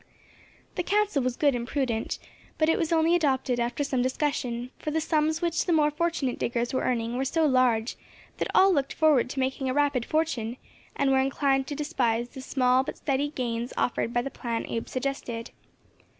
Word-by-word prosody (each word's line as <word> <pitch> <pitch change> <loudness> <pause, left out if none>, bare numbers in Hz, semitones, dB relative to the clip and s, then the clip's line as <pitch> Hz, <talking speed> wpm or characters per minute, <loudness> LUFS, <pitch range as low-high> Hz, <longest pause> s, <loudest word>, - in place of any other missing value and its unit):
The - - +2
counsel 405 -5 +1
was 250 -1 -1
good 285 -2 +3
and 240 -1 -3
prudent, 250 -5 -1 0.4
but 315 0 +2
it - - +2
was 330 -1 -1
only 325 0 +3
adopted 265 -6 +1
after 240 +4 -1
some 265 -3 0
discussion, 255 -2 -1
for - - -4
the 315 +1 0
sums 315 +1 0
which 340 +1 0
the - - +2
more 300 -2 +3
fortunate 310 -5 -1
diggers 235 +1 -1
were 260 - +1
earning 235 -1 -1
were 265 - 0
so 315 +4 +1
large 255 -4 +2 0.4
that - - -1
all 385 0 +6
looked 280 -4 0
forward 300 -6 +3
to 270 - -4
making 265 0 -1
a 255 - -1
rapid 285 -4 +2
fortune, 255 -7 -1 0.4
and 275 -1 +2
were 265 - +4
inclined 270 0 +1
to 290 - -4
despise 240 -5 0
the 265 - -9
small 255 -1 +2
but - - -6
steady 280 0 0
gains 240 -3 -3
offered 235 -1 0
by 240 0 0
the 275 - -5
plan 235 -2 -3
Abe 230 - -3
suggested. 255 -3 -4
265 Hz, 195 wpm, -27 LUFS, 245-300 Hz, 0.4 s, all